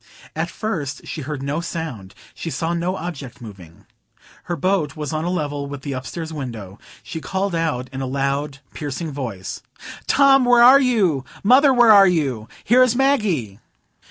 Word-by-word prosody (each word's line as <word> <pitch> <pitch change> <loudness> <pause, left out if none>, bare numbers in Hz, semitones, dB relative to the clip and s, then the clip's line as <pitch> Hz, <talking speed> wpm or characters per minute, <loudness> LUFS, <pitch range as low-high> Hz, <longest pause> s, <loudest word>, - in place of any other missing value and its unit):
At - - -2
first 170 -12 -4
she - - -6
heard 145 0 -5
no 145 +4 -2
sound; 160 - -6 0.2
she 165 - -6
saw 165 +1 -2
no 175 +2 -1
object 160 -8 -7
moving. 95 -8 -13 0.6
Her 175 - -2
boat 180 -5 0
was 150 -1 -5
on 155 +1 -2
a - - -1
level 145 -5 -3
with 140 -1 -8
the 140 - -4
upstairs 160 +5 -6
window. 115 -9 -7 0.2
She 160 - -7
called 190 +2 -2
out 160 -7 -1
in 135 - -4
a 135 - -3
loud, 140 +1 -2
piercing 150 +2 -5
voice,— 115 -10 -6 0.5
"Tom, 275 -1 +5
where 245 -1 +5
are 265 +3 +8
you? 200 - +1 0.2
Mother, 265 +6 +6
where 240 -3 +6
are 200 -2 +8
you? 135 - -1 0.2
Here 245 +4 +4
is 250 -2 +4
Maggie!" 205 - 0
155 Hz, 170 wpm, -21 LUFS, 135-195 Hz, 0.6 s, are